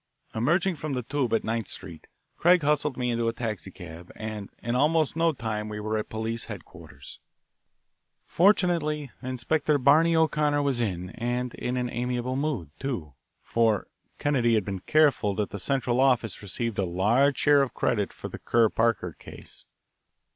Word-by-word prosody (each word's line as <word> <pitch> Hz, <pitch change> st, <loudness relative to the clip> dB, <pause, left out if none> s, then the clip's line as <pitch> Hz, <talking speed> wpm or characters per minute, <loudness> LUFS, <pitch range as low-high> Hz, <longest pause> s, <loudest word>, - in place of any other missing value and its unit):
Emerging 170 Hz, +11 st, +1 dB
from 155 Hz, -1 st, -4 dB
the 125 Hz, -1 st, -2 dB
"Tube" 130 Hz, 0 st, -1 dB
at 115 Hz, -, +1 dB
Ninth 115 Hz, 0 st, -2 dB
Street, 90 Hz, -4 st, -10 dB, 0.3 s
Craig 175 Hz, -1 st, +4 dB
hustled 150 Hz, -2 st, +1 dB
me 125 Hz, -1 st, 0 dB
into 115 Hz, 0 st, 0 dB
a 115 Hz, -, 0 dB
taxicab, 90 Hz, -7 st, -6 dB
and 110 Hz, -2 st, -6 dB
in 120 Hz, -, -3 dB
almost 155 Hz, +3 st, +2 dB
no 165 Hz, 0 st, +3 dB
time 110 Hz, -6 st, -4 dB
we 105 Hz, 0 st, -5 dB
were 110 Hz, +1 st, -2 dB
at 110 Hz, -, -3 dB
police 110 Hz, +1 st, -3 dB
headquarters. 85 Hz, -, -11 dB, 1.1 s
Fortunately, 165 Hz, -, +2 dB
Inspector 130 Hz, +4 st, 0 dB
Barney 155 Hz, +5 st, +4 dB
O'Connor 150 Hz, -2 st, +2 dB
was 135 Hz, -4 st, 0 dB
in 90 Hz, -5 st, -2 dB
and 120 Hz, +1 st, -2 dB
in 125 Hz, +1 st, -3 dB
an 125 Hz, -1 st, -2 dB
amiable 125 Hz, +1 st, -2 dB
mood, 135 Hz, -, -2 dB
too, 105 Hz, -, -4 dB, 0.3 s
for 115 Hz, -3 st, +1 dB, 0.3 s
Kennedy 125 Hz, -6 st, +2 dB
had 105 Hz, -4 st, +1 dB
been 95 Hz, -2 st, -4 dB
careful 140 Hz, -7 st, +3 dB
that 105 Hz, 0 st, -2 dB
the 100 Hz, -, -5 dB
Central 125 Hz, +2 st, 0 dB
Office 125 Hz, -4 st, +2 dB
received 105 Hz, +2 st, -3 dB
a -, -, +2 dB
large 110 Hz, +11 st, +2 dB
share 145 Hz, -1 st, +5 dB
of 135 Hz, -, -2 dB
credit 105 Hz, -4 st, 0 dB
for -, -, -8 dB
the -, -, -8 dB
Kerr 115 Hz, -2 st, +3 dB
Parker 110 Hz, -7 st, 0 dB
case. -, -, -12 dB
120 Hz, 160 wpm, -27 LUFS, 105-145 Hz, 1.1 s, share